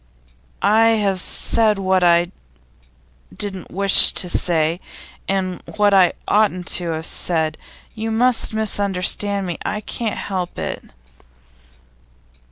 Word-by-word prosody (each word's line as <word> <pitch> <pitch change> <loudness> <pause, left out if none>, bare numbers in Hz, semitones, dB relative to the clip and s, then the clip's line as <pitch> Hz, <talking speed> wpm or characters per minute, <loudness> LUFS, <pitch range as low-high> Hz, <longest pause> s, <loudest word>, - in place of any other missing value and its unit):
'I 220 +2 +4 0.2
have 195 -2 0
said 220 -2 +1
what 190 -1 +1
I 175 0 +3 1.1
didn't 190 -3 -4
wish 195 +1 +4
to 180 - 0
say, 165 -1 +1 0.5
and 185 -2 -2 0.2
what 205 -1 +3
I 185 -3 +5
oughtn't 200 -4 +1
to 175 -1 -4
have 160 0 -5
said. 160 -3 -1 0.4
You 225 0 -4
must 240 +2 +2
misunderstand 200 -2 -1
me; 175 -2 -5
I 210 - -3
can't 215 0 -4
help 185 -3 -4
it. - - -5
195 Hz, 115 wpm, -19 LUFS, 180-210 Hz, 1.1 s, I